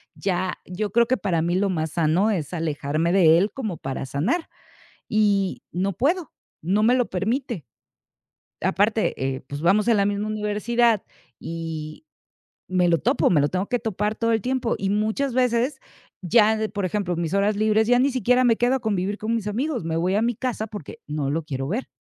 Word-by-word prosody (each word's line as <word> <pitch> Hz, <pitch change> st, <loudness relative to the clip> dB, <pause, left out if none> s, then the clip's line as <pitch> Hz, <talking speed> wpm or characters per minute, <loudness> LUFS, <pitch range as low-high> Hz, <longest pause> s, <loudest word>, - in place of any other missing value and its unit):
Ya, 185 Hz, -2 st, -1 dB
yo 200 Hz, +3 st, -4 dB
creo 235 Hz, +2 st, +3 dB
que, 255 Hz, 0 st, +1 dB
para 185 Hz, -5 st, 0 dB
mí 175 Hz, +2 st, 0 dB
lo 200 Hz, +1 st, +1 dB
más 160 Hz, -4 st, -2 dB
sano, 170 Hz, +6 st, +2 dB
es 165 Hz, -5 st, -3 dB
alejarme 160 Hz, 0 st, -1 dB
de 170 Hz, -4 st, +6 dB
él, 195 Hz, +4 st, +1 dB
como 215 Hz, -10 st, -4 dB
para 135 Hz, -1 st, -4 dB
sanar, 190 Hz, -, -1 dB, 0.6 s
y 200 Hz, -3 st, +1 dB
no 190 Hz, +3 st, -1 dB
puedo, 325 Hz, -, 0 dB, 0.3 s
no 195 Hz, +6 st, +1 dB
me 235 Hz, +3 st, +5 dB
lo 250 Hz, -2 st, +2 dB
permite. 220 Hz, -, -2 dB, 1.0 s
Aparte, 205 Hz, +4 st, +1 dB, 0.2 s
eh, -, -, -8 dB
pues, 145 Hz, +1 st, -5 dB
vamos 200 Hz, +6 st, +3 dB
en 230 Hz, -, +5 dB
la 200 Hz, -, +3 dB
misma 205 Hz, +1 st, -1 dB
universidad, 215 Hz, +1 st, +1 dB, 0.4 s
y, 160 Hz, -, -6 dB, 0.7 s
me 180 Hz, -1 st, +2 dB
lo 165 Hz, -, +4 dB
topo, 255 Hz, +4 st, +2 dB
me 160 Hz, -, +4 dB
lo 145 Hz, -, +2 dB
tengo 185 Hz, +2 st, -2 dB
que 245 Hz, -, 0 dB
topar, 210 Hz, -1 st, -2 dB
todo 230 Hz, 0 st, +1 dB
el 220 Hz, -, +1 dB
tiempo. 250 Hz, 0 st, -1 dB
Y 195 Hz, -, -2 dB
muchas 220 Hz, +6 st, 0 dB
veces 250 Hz, +2 st, +1 dB, 0.4 s
ya 215 Hz, +3 st, +4 dB
de 220 Hz, 0 st, -1 dB
por 200 Hz, -, -4 dB
ejemplo, 185 Hz, -1 st, -1 dB
mis 165 Hz, 0 st, -2 dB
horas 200 Hz, +1 st, +2 dB
libres, 215 Hz, +1 st, +2 dB
ya 245 Hz, -, +5 dB
ni 275 Hz, +2 st, +3 dB
siquiera 250 Hz, +1 st, +2 dB
me 230 Hz, -2 st, +4 dB
quedo 245 Hz, +2 st, +2 dB
a 265 Hz, -, -1 dB
convivir 205 Hz, -2 st, -1 dB
con 220 Hz, +2 st, -2 dB
mis 215 Hz, -2 st, -3 dB
amigos, 240 Hz, -, -2 dB
me 160 Hz, -, -2 dB
voy 180 Hz, +3 st, +1 dB
a 210 Hz, -, +2 dB
mi 235 Hz, 0 st, 0 dB
casa 235 Hz, -3 st, -3 dB
porque 205 Hz, -8 st, -9 dB
no 150 Hz, -2 st, -2 dB
lo 160 Hz, +1 st, -1 dB
quiero 135 Hz, -2 st, -4 dB
ver. 235 Hz, +7 st, -2 dB
205 Hz, 200 wpm, -23 LUFS, 175-230 Hz, 1.0 s, de